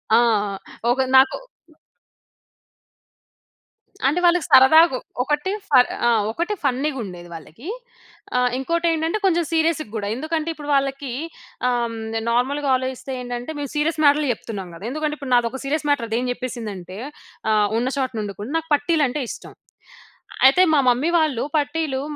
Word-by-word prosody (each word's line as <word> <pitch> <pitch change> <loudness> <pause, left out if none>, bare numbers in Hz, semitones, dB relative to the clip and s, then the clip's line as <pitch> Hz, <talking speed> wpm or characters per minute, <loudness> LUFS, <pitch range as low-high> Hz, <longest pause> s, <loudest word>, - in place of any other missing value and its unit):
ఆ! - - +7 0.7
ఒక 260 +2 +1
నాకు 265 +1 +5 2.7
అంటే 300 +6 +1
వాళ్ళకి 350 -1 +3
సరదాగా, 290 +2 +7 0.3
ఒకటి 295 +6 -1 0.2
ఫర్ 255 -4 +5 0.2
ఆ! - - +4 0.2
ఒకటి 345 - -2
ఫన్నీగుండేది 250 -11 -2
వాళ్ళకి, 165 - -11 0.7
ఆ! - - +3 0.2
ఇంకోటి 335 +6 -1
ఏంటంటే 325 +5 -1
కొంచెం 345 -2 +3
సీరియస్‌ 320 -1 +2
గూడా, 205 -2 -3
ఎందుకంటే 315 +4 -2
ఇప్పుడు 295 -2 -9
వాళ్ళకీ 275 -1 -1 0.6
ఆహ్, 235 -2 -1 0.4
నార్మల్‌గా 275 +4 0
ఆలోచిస్తే 260 +1 -4
ఏంటంటే, 245 +4 -5
మేము 285 -1 -4
సీరియస్ 310 +1 0
మ్యాటర్‌‌లే 290 0 +4
చెప్తున్నాం 200 -5 -7
గదా! 190 - -9
ఎందుకంటే 305 +1 -2
ఇప్పుడు 270 -3 -3
నాదొక 240 +2 0
సీరియస్ 295 +2 -1
మ్యాటర్ 265 -5 +1
అది 225 - 0
ఏం 255 - -2
చెప్పేసిందంటే, 215 -8 -6 0.5
ఆహ్, 210 -1 +3
ఉన్న 245 - -1
చోటనుండకుండ 215 -5 -3
నాకు 325 0 -5
పట్టీలు 300 +1 +1
అంటే 290 +4 -3
ఇష్టం, - - -9 0.9
అయితే 275 +7 +6
మా 300 - +5
మమ్మీ 250 +7 +2
వాళ్ళు 300 -7 0
పట్టీలు 290 -2 -1
270 Hz, 135 wpm, -22 LUFS, 240-310 Hz, 2.7 s, ఆ